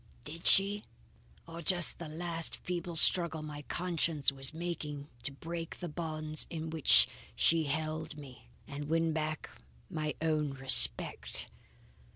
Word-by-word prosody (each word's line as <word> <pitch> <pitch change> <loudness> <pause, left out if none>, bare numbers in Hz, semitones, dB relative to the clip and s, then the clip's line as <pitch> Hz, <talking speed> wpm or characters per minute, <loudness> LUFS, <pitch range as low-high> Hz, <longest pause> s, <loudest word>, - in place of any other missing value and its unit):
"Did 165 +3 -3
she, 200 +1 +4 0.6
or 165 0 -10
just 175 0 +1
the 170 - -7
last 165 +1 -1
feeble 175 -1 -6
struggle 160 -1 +4
my 150 -1 -8
conscience 165 -3 -1
was 135 0 -3
making 155 -3 -6
to 140 - -2
break 165 +4 -8
the 175 - -6
bonds 155 -1 -1
in 160 -1 -6
which 160 -4 +5 0.3
she 165 -1 +2
held 155 +1 -4
me, 125 -5 -13 0.2
and 145 +1 -7
win 165 0 0
back 155 0 -4 0.4
my 155 -1 -4
own 155 -3 -2
respect? 130 -3 +4
160 Hz, 135 wpm, -31 LUFS, 150-170 Hz, 0.6 s, which